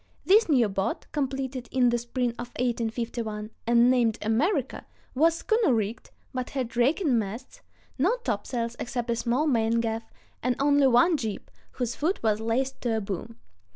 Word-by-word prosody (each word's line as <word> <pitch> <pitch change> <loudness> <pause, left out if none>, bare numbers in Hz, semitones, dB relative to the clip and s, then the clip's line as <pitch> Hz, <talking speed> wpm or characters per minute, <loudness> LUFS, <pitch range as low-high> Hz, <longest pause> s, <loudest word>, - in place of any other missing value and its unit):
This 420 +1 +5
new 250 -7 +4
boat, 195 -1 -2
completed 265 -3 -3
in 255 -2 +3
the 240 0 +1
spring 240 +1 -1
of 240 - -4
1851, 230 -2 -2 0.2
and 235 +1 +5
named 235 -3 +2
America, 265 - 0 0.3
was 320 +5 +3
schooner 435 - +2
rigged, 220 +1 -3 0.2
but 255 -1 -3
had 255 -4 -4
raking 265 - +2
masts, 225 - -6 0.4
no 380 - +3
topsails 230 +1 -2
except 245 -1 -3
a - - +1
small 240 +5 0
main 230 -5 +2
gaff, 225 0 -3 0.3
and 250 0 +1
only 285 0 +4
one 315 +7 +4
jib, 220 -6 -5 0.2
whose 245 -2 -2
foot 335 +2 -1
was 215 -1 +2
laced 250 +4 -1
to 230 -2 0
a - - +1
boom. 205 +3 -6
240 Hz, 160 wpm, -27 LUFS, 225-270 Hz, 0.4 s, This